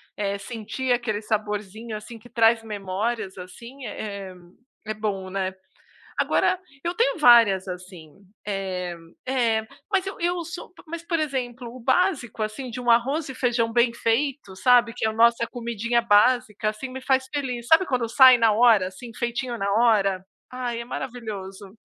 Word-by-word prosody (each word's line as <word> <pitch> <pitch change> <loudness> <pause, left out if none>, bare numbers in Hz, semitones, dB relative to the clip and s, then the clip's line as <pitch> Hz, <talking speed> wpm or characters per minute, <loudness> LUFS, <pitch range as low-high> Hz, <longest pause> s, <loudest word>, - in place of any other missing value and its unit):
eh, 200 -1 -2
sentir 230 +4 -3
aquele 230 -4 -1
saborzinho, 215 +1 -3
assim, 225 +2 -10
que 245 +3 -16
traz 225 0 +3
memórias, 210 0 -3
assim, 235 +9 -10
é 200 -2 -6
é - - -14 0.5
é 215 - -2
bom, 195 -3 -3
né. 190 -1 -2 0.7
Agora, 370 - +2 0.2
eu 345 - -1
tenho 465 -2 +1
várias, 230 - +6
assim. 180 -3 -9 0.4
Eh, 190 -3 -3 0.3
é. 230 -4 +1 0.2
Mas, 385 -1 +1
eu 390 - -6
eu 345 0 0
sou 345 +2 -8
p - - -17
mas, 335 +1 -6
por 335 - 0
exemplo, 250 -5 -3
o 255 - -10
básico, 260 - +1
assim, 240 +4 -4
de 250 - -6
um 245 -1 +1
arroz 270 +7 +2
e 265 - -6
feijão 235 -3 0
bem 235 0 +3
feito, 235 -2 -1
sabe, 245 0 +4
que 245 - -3
é - - +2
a 220 - -2
nossa 235 +1 +4
comidinha 235 -1 -1
básica, 220 0 +3
assim, 215 +5 -4
me 260 +1 -7
faz 260 0 +1
feliz. 250 -4 -3
Sabe 325 +7 +5
quando 250 -6 -1
sai 260 +1 +8
na 225 -2 +4
hora, 215 -4 +5
assim, 230 +6 -11
feitinho 240 +1 -2
na 200 -1 -1
hora? 205 -4 +3 0.3
Ai, 245 -2 -3
é 235 - -5
maravilhoso. 205 -6 -7
235 Hz, 170 wpm, -24 LUFS, 210-255 Hz, 0.7 s, sai